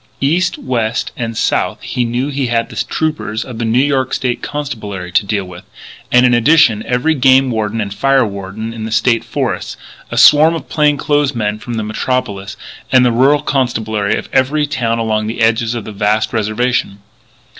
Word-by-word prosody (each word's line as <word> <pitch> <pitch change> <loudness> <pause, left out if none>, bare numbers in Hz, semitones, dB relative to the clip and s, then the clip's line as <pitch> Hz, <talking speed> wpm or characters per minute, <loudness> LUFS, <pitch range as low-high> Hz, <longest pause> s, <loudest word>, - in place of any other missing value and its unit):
East, 170 +6 +1
west 115 -3 -2
and 115 -2 -4
south - - 0
he 125 - -2
knew 120 +4 -2
he 135 -2 -2
had 115 -1 -1
the - - -11
troopers 110 -8 -2
of 120 -3 -8
the 115 - -1
New 110 +2 +1
York 135 -1 +1
State 125 -2 -2
Constabulary 105 -11 -5
to 100 +2 +1
deal 100 -2 -1
with, 90 -1 -11 0.5
and 125 0 +5
in 125 - +4
addition 120 -3 +4
every 125 +6 +1
game 130 -2 +4
warden 110 0 -2
and 100 -2 -3
fire 135 +3 +2
warden 100 +2 -6
in 110 -1 -6
the 110 - -6
State 115 0 +2
Forests, - - -3 0.3
a - - -5
swarm 155 +3 +6
of 165 - -7
plain 150 -2 +2
clothes 145 -1 0
men 105 -2 -2
from 120 +1 -6
the 110 - -2
Metropolis, 105 -3 -3 0.3
and 130 -1 +5
the 120 - +3
rural 135 +5 +3
constabulary 110 -6 -1
of - - -5
every 145 +3 +2
town 125 -6 -1
along 110 -2 -1
the 115 - -5
edges 115 +1 +1
of 115 - -5
the - - -7
vast 105 +3 0
reservation. 110 -1 -1
115 Hz, 190 wpm, -15 LUFS, 110-135 Hz, 0.5 s, swarm